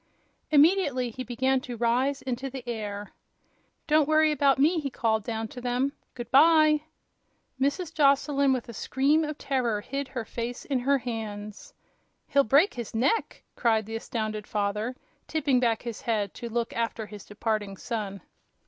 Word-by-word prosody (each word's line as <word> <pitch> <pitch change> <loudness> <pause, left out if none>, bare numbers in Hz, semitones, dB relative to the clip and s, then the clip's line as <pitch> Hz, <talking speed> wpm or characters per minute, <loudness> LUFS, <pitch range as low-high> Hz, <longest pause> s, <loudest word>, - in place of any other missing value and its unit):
Immediately 290 -5 +3
he 255 +3 -6
began 255 +2 0
to 245 -2 -7
rise 250 +4 +1
into 260 +1 -3
the 260 -2 -8
air. 210 -3 -5 0.7
"Don't 305 -1 +3
worry 310 0 +4
about 280 -2 +3
me!" 320 +5 +3
he 285 -3 -3
called 220 -4 0
down 225 0 -3
to 245 - -9
them. 250 +3 0 0.2
"Good 240 -1 -7
by!" 310 +1 +6 0.8
Mrs. 300 +5 0
Joslyn, 280 -1 +3
with 255 -3 -1
a 235 - -8
scream 275 +8 +1
of 300 -1 -4
terror, 240 -6 -1
hid 275 +5 -4
her 245 -4 -5
face 235 +2 -5
in 270 -3 0
her 275 +3 +2
hands. 215 -4 -6 0.5
"He'll 280 - +4
break 280 - +4
his 235 -2 -6
neck!" 270 - 0
cried 220 -3 +2
the 225 +1 -6
astounded 215 -2 -4
father, 210 +4 -1 0.3
tipping 285 -5 +1
back 230 -3 +1
his 235 -3 -6
head 210 -4 -1
to 235 -1 -7
look 235 0 -2
after 230 -1 -2
his 210 -2 -10
departing 205 -2 -3
son. 205 -5 -4
245 Hz, 160 wpm, -27 LUFS, 225-280 Hz, 0.8 s, by